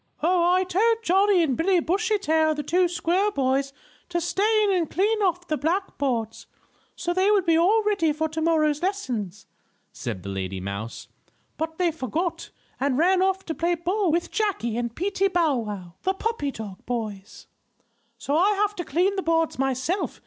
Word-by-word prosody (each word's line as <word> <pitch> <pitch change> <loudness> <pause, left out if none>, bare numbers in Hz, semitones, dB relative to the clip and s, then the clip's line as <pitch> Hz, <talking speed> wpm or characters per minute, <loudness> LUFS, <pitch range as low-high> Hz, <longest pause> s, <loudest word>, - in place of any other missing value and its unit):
"Oh, 350 +1 +3
I 370 +1 +3
told 445 +5 +1
Johnnie 385 -1 +4
and 275 -6 0
Billy 360 +4 +2
Bushytail, 335 -4 +1
the 295 - -4
two 355 +5 +2
squirrel 355 +4 +1
boys, 275 -4 0 0.4
to 345 0 0
stay 425 +5 +2
in 410 - +2
and 350 -5 0
clean 425 +4 +1
off 355 -2 0
the 310 - -1
black 345 +8 -2
boards, 230 -5 -2 0.5
so 350 -1 -2
they 375 +3 +2
would 405 -3 +3
be 330 -2 +4
all 395 +7 +4
ready 395 -7 +1
for 315 +2 -1
tomorrow's 315 -1 +1
lesson," 260 - -2 0.6
said 90 - -5
the 100 - -6
lady 95 -1 -4
mouse. 100 +4 -6 0.5
"But 320 0 -4
they 355 -2 +2
forgot, 320 - -3 0.3
and 275 -2 +1
ran 365 +4 +3
off 385 0 +1
to 325 - -3
play 340 +2 0
ball 360 +2 0
with 340 +2 -1
Jackie 390 - -1
and 235 -1 -3
Peetie 390 +2 0
Bow 335 -7 +2
Wow, 200 -6 -6
the 380 +1 0
puppy 445 -8 -2
dog 210 -7 -8
boys. 215 -5 -5 0.7
So 285 - -2
I 380 +6 +4
have 415 +1 0
to 350 - -2
clean 360 +7 +1
the - - +1
boards 330 -4 0
myself. 270 +8 -1
335 Hz, 180 wpm, -25 LUFS, 275-385 Hz, 0.7 s, Johnnie